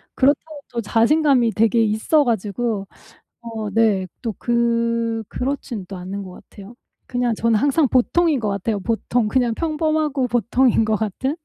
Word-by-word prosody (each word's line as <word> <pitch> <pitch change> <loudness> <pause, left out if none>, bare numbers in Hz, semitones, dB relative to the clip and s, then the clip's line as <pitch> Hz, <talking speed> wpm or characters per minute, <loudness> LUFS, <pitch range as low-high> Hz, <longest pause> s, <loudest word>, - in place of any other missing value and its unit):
그렇다고 290 +2 +1
또 235 - -2
자신감이 245 +2 +3
되게 225 +1 +2
있어 220 +8 +2
가지고 220 -2 -2 0.5
어 225 -2 -5
네 205 -3 +2
또 225 -3 -3
그 230 -1 0
그렇진 250 -6 -4
또 195 - -7
않은 195 +3 -6
것 185 - -10
같아요. 200 +4 -14 0.3
그냥 245 -1 -1
저는 230 0 +1
항상 285 +2 +2
보통인 300 +4 +2
것 215 -3 -2
같아요, 200 +1 -2
보통. 230 +2 -1
그냥 245 0 +1
평범하고 310 -2 0
보통인 240 +1 +2
것 220 - +1
같은?. 220 - -2
235 Hz, 300 characters per minute, -21 LUFS, 215-265 Hz, 0.5 s, 자신감이